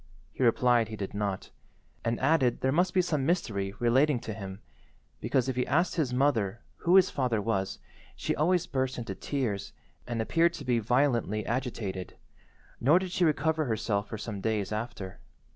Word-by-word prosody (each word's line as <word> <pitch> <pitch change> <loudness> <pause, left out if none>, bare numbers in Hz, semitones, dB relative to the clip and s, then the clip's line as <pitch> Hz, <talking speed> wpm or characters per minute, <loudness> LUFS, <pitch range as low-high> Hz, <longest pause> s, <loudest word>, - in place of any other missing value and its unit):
He - - -8
replied 120 -1 +4
he 110 - -6
did 100 -2 -5
not, 100 -2 -3 0.5
and 115 0 -1
added 135 -4 +2
there 130 - +2
must 180 +5 +2
be 185 -1 +3
some 150 -5 0
mystery 105 - -1
relating 130 +3 +3
to 110 - -5
him, 95 -2 -7 0.6
because 125 +2 +1
if 130 - -1
he 125 - 0
asked 170 +5 +2
his 150 -7 0
mother 120 -6 +1 0.2
who 175 +2 +3
his 190 -1 +6
father 125 -5 0
was 100 -3 -1 0.4
she - - -2
always 175 +3 +2
burst 130 -1 -1
into 115 -5 -4
tears 105 -6 -3 0.3
and 120 -1 -2
appeared 165 +9 +2
to 140 - -8
be 120 -2 +2
violently 120 -2 +1
agitated, 115 -7 -3 0.6
nor 145 +8 +5
did 185 -1 -2
she 180 - +1
recover 160 0 +1
herself 110 -3 -1
for 110 - -4
some 105 -2 -5
days 110 -2 -1
after. 110 -3 -5
120 Hz, 175 wpm, -29 LUFS, 110-145 Hz, 0.6 s, his